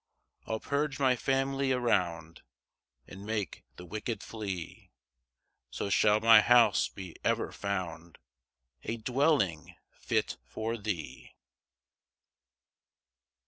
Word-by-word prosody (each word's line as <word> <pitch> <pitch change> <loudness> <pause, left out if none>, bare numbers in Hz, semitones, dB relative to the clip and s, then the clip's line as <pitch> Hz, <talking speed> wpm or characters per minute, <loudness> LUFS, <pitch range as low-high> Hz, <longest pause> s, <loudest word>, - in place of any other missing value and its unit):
6 - - -16
I'll 110 0 -1
purge 145 +1 -2
my 130 -2 +3
family 135 +1 0
around, 85 -10 0 0.6
And 95 +1 -11
make 105 - -4
the 90 - -10
wicked 110 +5 -4
flee; 100 -6 -6 0.8
So 100 - -4
shall 105 +1 +4
my 115 -1 +8
house 120 -4 +5
be 95 -3 -9
ever - - 0
found 85 -4 -5 0.6
A 115 - -4
dwelling 125 - +1 0.2
fit - - -2
for 110 - -4
thee. 100 -8 -6
110 Hz, 100 wpm, -30 LUFS, 90-125 Hz, 0.8 s, my